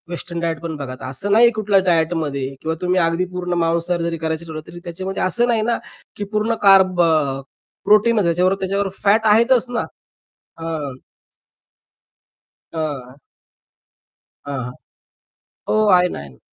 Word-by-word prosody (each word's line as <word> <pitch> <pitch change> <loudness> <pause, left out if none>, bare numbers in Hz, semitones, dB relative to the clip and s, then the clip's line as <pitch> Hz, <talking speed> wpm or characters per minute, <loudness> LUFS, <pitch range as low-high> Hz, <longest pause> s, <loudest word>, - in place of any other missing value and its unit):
Western 170 0 -6
diet 165 -2 -2
पण 165 -2 -5
बघा. 135 -3 -6
असं 165 +10 -3
नाही 235 +3 +6
कुठल्या 210 -3 +2
डायटमध्ये 160 -5 0
किंवा 160 0 -2
तुम्ही 180 +1 +1
अगदी 165 +1 +1
पूर्ण 180 -1 -3
मांसाहार 170 +1 0
जरी 170 0 -2
करायचं 160 +1 -3
ठरवलं, 155 -1 -7
तरी 175 - -10
त्याच्यामध्ये 185 +3 -4
असं 235 +7 +1
नाही 230 -2 +2
ना 235 +2 0 0.4
की 205 - -3
पूर्ण 215 +2 0
कार्ब, 190 -2 +5
अ, 150 -5 +1 0.4
प्रोटीन 215 +3 +4
याच्याबरोबर 180 +3 +2
त्याच्याबरोबर 195 0 -1
फॅट 210 +2 +3
आहेतच 235 +4 +4
ना. 245 - -1 0.8
अं 155 -5 -4 1.8
हां. 145 -4 -5 1.3
हां, 140 -1 -3
हां. 125 - -6 1.0
हो - - +2 0.2
आहे 180 0 +4
ना, - - -6
आहे 70 -1 -10
ना. 65 - -19
175 Hz, 145 wpm, -20 LUFS, 160-200 Hz, 1.8 s, नाही